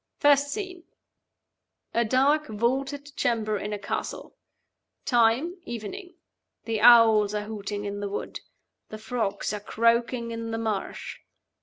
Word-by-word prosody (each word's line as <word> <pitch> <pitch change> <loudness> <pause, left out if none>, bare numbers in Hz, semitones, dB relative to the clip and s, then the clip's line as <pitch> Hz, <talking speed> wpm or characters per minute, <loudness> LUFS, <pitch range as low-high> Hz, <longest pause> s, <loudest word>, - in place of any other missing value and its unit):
First 285 -1 +4
scene: 365 0 -6 1.1
a 235 - +2
dark 275 +6 +2
vaulted 270 +6 -2
chamber 215 -3 0
in 210 - -5
a 210 - -2
castle. 200 - -5 0.7
Time, 245 +8 +2
evening. 350 - -7 0.5
The 225 -2 -2
owls 220 -3 +7
are 210 - -1
hooting 205 -1 -5
in 205 0 -4
the 205 0 -3
wood; 200 - -5 0.5
the 215 - -7
frogs 215 -3 -2
are 210 - -3
croaking 235 +2 +1
in 230 0 -5
the 225 - -2
marsh. 220 -3 -4
230 Hz, 130 wpm, -26 LUFS, 210-270 Hz, 1.1 s, owls